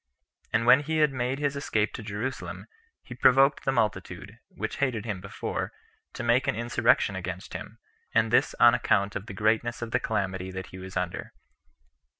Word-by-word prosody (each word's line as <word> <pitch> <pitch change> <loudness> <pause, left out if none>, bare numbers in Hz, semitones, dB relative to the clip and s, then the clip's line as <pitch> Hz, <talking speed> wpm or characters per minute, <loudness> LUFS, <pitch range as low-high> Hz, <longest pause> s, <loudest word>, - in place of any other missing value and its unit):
And 115 +1 +1
when 125 +3 +8
he 155 +2 -2
had 150 -3 +3
made 125 +1 -1
his 145 -1 -1
escape 110 -6 0
to - - -6
Jerusalem, 110 +5 -5 0.4
he 125 - -9
provoked 135 +3 +4
the 135 - +2
multitude, 110 -6 -2
which - - -5
hated 125 -6 -1
him 100 -5 -4
before, 100 - -4 0.4
to - - -5
make 120 +2 +2
an - - +1
insurrection 120 -3 +2
against 90 0 -6
him, - - -7 0.3
and - - +2
this - - +3
on - - +8
account 100 +1 +1
of 105 - -5
the 100 - -7
greatness 115 +4 +1
of 115 - -6
the - - +2
calamity 95 -2 -2
that 95 0 -7
he 95 - -8
was 95 0 -6
under. 90 -1 -3
115 Hz, 180 wpm, -27 LUFS, 100-130 Hz, 0.4 s, when